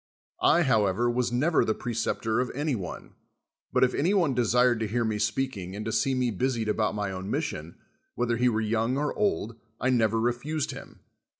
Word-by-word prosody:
I, 170 Hz, +2 st, +5 dB
however, 115 Hz, -, +2 dB
was 120 Hz, 0 st, 0 dB
never 145 Hz, +7 st, +2 dB
the 110 Hz, -, 0 dB
pre 120 Hz, -, -4 dB
ceptor 110 Hz, 0 st, -1 dB
of 125 Hz, -, -2 dB
any 145 Hz, +1 st, -1 dB
one; 95 Hz, -7 st, -6 dB, 0.6 s
but -, -, +3 dB
if 125 Hz, -, +3 dB
any 175 Hz, +8 st, +1 dB
one 170 Hz, -8 st, +2 dB
desired 125 Hz, 0 st, +3 dB
to 110 Hz, -, -1 dB
hear 115 Hz, +2 st, 0 dB
me 110 Hz, -1 st, -1 dB
speaking 100 Hz, -8 st, -2 dB
and 105 Hz, +1 st, -5 dB
to 110 Hz, -, -2 dB
see 135 Hz, +3 st, +1 dB
me 125 Hz, -2 st, +1 dB
busied 115 Hz, +1 st, -1 dB
a])Out 105 Hz, 0 st, 0 dB
my 100 Hz, -2 st, -2 dB
own 95 Hz, +1 st, -6 dB
mission, 95 Hz, -, -3 dB, 0.4 s
whether 120 Hz, -1 st, 0 dB
he 125 Hz, +1 st, +3 dB
were 110 Hz, -1 st, 0 dB
young 115 Hz, +3 st, 0 dB
or 145 Hz, +1 st, -1 dB
old, 115 Hz, -, -1 dB, 0.2 s
I 130 Hz, -, +1 dB
never 115 Hz, -2 st, +2 dB
refused 125 Hz, +6 st, -1 dB
him. -, -, -11 dB
120 Hz, 200 wpm, -27 LUFS, 110-130 Hz, 0.6 s, I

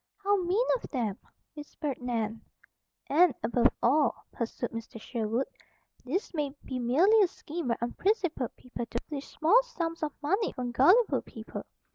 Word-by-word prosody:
"How 405 Hz, +1 st, +4 dB
mean 375 Hz, +7 st, +2 dB
of -, -, -10 dB
them!" 225 Hz, -8 st, -2 dB, 0.3 s
whispered 295 Hz, -2 st, -5 dB
Nan. 225 Hz, -3 st, -2 dB, 0.7 s
"And, 320 Hz, -1 st, +5 dB
above 240 Hz, +1 st, +4 dB, 0.2 s
all," 285 Hz, +5 st, +4 dB, 0.2 s
pursued 235 Hz, +1 st, -3 dB
Mr. 230 Hz, 0 st, -7 dB
Sherwood, 230 Hz, +3 st, -1 dB, 0.6 s
"this 330 Hz, +12 st, -2 dB
may 295 Hz, -3 st, -2 dB
be 255 Hz, -1 st, -3 dB
merely 340 Hz, -, +5 dB
a 390 Hz, -, +5 dB
scheme 335 Hz, -2 st, -6 dB
by 235 Hz, -, +1 dB
unprincipled 330 Hz, -, 0 dB
people 245 Hz, -1 st, -6 dB
to 235 Hz, -, -3 dB
filch 290 Hz, -2 st, -5 dB
small 350 Hz, +11 st, +4 dB
sums 340 Hz, -10 st, -4 dB
of 300 Hz, -2 st, -2 dB
money 390 Hz, +9 st, +1 dB
from 250 Hz, -2 st, -3 dB
gullible 365 Hz, -, +5 dB
people. -, -, -8 dB
285 Hz, 150 wpm, -29 LUFS, 240-355 Hz, 0.7 s, And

